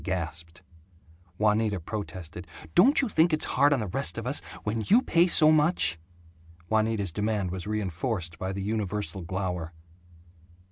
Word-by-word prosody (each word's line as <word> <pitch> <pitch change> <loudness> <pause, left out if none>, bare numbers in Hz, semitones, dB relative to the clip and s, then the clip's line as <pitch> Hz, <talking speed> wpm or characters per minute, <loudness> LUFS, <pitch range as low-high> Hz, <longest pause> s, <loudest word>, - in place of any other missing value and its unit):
They - - -14
gasped. 85 -1 -5 0.7
Juanita 105 -1 +1
protested, 90 -2 -7 0.3
"Don't 260 - +5
you - - +1
think 170 -4 +3
it's 155 - +1
hard 140 +3 +3
on 140 - +2
the 110 - -2
rest 90 - -3
of - - -4
us - - 0 0.2
when 110 +2 -2
you 235 +6 +5
pay 170 +1 +3
so 155 -3 +6
much?" 155 - +2 0.7
Juanita's 110 -3 +1
demand 105 0 -1
was 95 +1 -5
reinforced 95 -4 -3
by 95 0 -3
the 95 0 -4
universal 105 -2 -3
glower. 90 -2 -4
105 Hz, 150 wpm, -27 LUFS, 90-115 Hz, 0.7 s, so